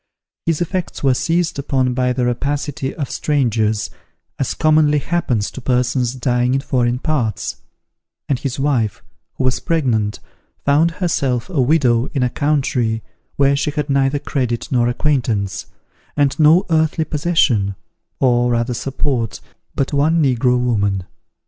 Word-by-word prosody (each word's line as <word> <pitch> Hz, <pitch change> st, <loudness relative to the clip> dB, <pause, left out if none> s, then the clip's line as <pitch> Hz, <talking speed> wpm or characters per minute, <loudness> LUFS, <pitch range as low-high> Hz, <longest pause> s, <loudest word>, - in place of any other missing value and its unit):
His 165 Hz, 0 st, +1 dB
effects 175 Hz, -1 st, -3 dB
were 135 Hz, -2 st, +4 dB
seized 165 Hz, +5 st, 0 dB
upon 130 Hz, -2 st, 0 dB
by 125 Hz, 0 st, +1 dB
the 125 Hz, 0 st, 0 dB
rapacity 140 Hz, +2 st, -2 dB
of 145 Hz, -6 st, -4 dB
strangers, 110 Hz, -7 st, 0 dB, 0.5 s
as 135 Hz, -, -1 dB
commonly 155 Hz, -1 st, +3 dB
happens 140 Hz, -9 st, -1 dB
to 130 Hz, -, -8 dB
persons 125 Hz, 0 st, 0 dB
dying 125 Hz, 0 st, +1 dB
in 135 Hz, -, 0 dB
foreign 125 Hz, -3 st, 0 dB
parts; 125 Hz, -, -2 dB, 0.7 s
and 135 Hz, -4 st, 0 dB
his 135 Hz, -1 st, -4 dB
wife, 125 Hz, -8 st, 0 dB, 0.3 s
who -, -, -3 dB
was 130 Hz, 0 st, +1 dB
pregnant, 125 Hz, -, 0 dB, 0.5 s
found 150 Hz, +4 st, +4 dB
herself 150 Hz, -, -1 dB
a 150 Hz, -7 st, +1 dB
widow 125 Hz, -4 st, +3 dB
in 135 Hz, -, +2 dB
a 125 Hz, -, 0 dB
country 130 Hz, -7 st, 0 dB, 0.3 s
where 140 Hz, 0 st, +3 dB
she 145 Hz, -, 0 dB
had 150 Hz, -1 st, -2 dB
neither 135 Hz, +1 st, +2 dB
credit 125 Hz, -4 st, -2 dB
nor 120 Hz, -2 st, +2 dB
acquaintance, 120 Hz, -7 st, -1 dB, 0.5 s
and 145 Hz, 0 st, +1 dB
no 160 Hz, +5 st, +5 dB
earthly 160 Hz, 0 st, +2 dB
possession, 145 Hz, -, +1 dB, 0.4 s
or 120 Hz, -2 st, +3 dB
rather 120 Hz, +1 st, 0 dB
support, 130 Hz, -2 st, -2 dB, 0.4 s
but 135 Hz, +2 st, -1 dB
one 155 Hz, +4 st, +3 dB
negro 125 Hz, -3 st, +2 dB
woman. 100 Hz, -6 st, 0 dB
135 Hz, 140 wpm, -19 LUFS, 120-150 Hz, 0.7 s, no